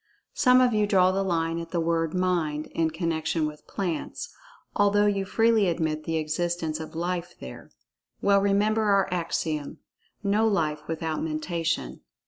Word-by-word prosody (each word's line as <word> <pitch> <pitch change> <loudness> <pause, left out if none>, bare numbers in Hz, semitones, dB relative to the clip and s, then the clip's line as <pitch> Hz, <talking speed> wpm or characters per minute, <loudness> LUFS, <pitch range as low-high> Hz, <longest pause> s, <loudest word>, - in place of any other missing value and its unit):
Some 255 -2 +5
of 250 -2 +3
you 210 -1 +2
draw 185 -2 +4
the 195 +1 0
line 165 -3 0
at 165 0 -7
the 170 - -1
word 165 0 0
"Mind" 170 -5 0
in 165 -1 +1
connection 160 -1 -1
with 150 0 -7
plants, 180 -5 -4 0.4
although 205 0 +3
you 200 -1 +1
freely 225 0 +3
admit 160 -3 -1
the 165 0 -1
existence 160 0 -2
of 160 0 -8
"Life" 175 +1 -3
there. 65 - -10 0.5
Well, 200 0 +3
remember 205 +2 +2
our 200 -2 +3
axiom—"no 175 +6 -2
Life 155 -7 -1
without 160 -1 -3
Mentation." 165 +1 -2
170 Hz, 145 wpm, -26 LUFS, 160-200 Hz, 0.5 s, Some